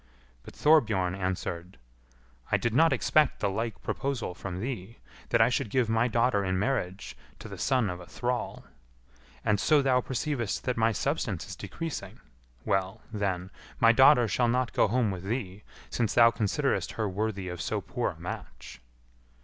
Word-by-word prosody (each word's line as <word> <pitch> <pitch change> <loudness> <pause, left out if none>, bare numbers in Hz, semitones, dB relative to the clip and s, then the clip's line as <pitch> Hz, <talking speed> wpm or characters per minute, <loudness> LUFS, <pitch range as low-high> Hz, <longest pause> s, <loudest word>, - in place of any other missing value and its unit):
But - - -13
Thorbjorn 110 - +3
answered, 90 -3 -4 0.7
"I - - +4
did 120 -2 -1
not 160 +6 +5
expect 155 -1 +2
the 100 - 0
like 110 +1 -4
proposal 135 -9 -2
from 90 0 -6
thee, 115 -2 -5 0.3
that 115 - +3
I 115 - +3
should 120 -3 -1
give 125 0 +1
my 115 +2 +2
daughter 115 -3 +2
in 95 -1 0
marriage 100 -4 -2 0.2
to - - -10
the - - -9
son 130 -5 +2
of 90 -1 -4
a 90 - -11
thrall. 125 0 -3 0.8
And 105 -2 +2
so 150 +4 +4
thou 130 -2 +3
perceivest 130 -3 -2
that 125 - -1
my 115 0 +2
substance 110 - -2
is 95 - -7
decreasing; 155 - -6 0.5
well, 95 +2 -1
then, 95 -3 -2 0.3
my 115 -1 +7
daughter 130 0 +6
shall 120 +5 +1
not 125 +1 0
go - - +3
home 115 -1 +1
with 95 -1 -6
thee, 105 -3 -3 0.3
since 115 -3 -1
thou 115 -1 +7
considerest 125 +7 -1
her 110 -2 -1
worthy 100 -1 -2
of 90 -1 -5
so - - -1
poor - - -2
a - - -19
match." - - -8
110 Hz, 170 wpm, -28 LUFS, 95-125 Hz, 0.8 s, my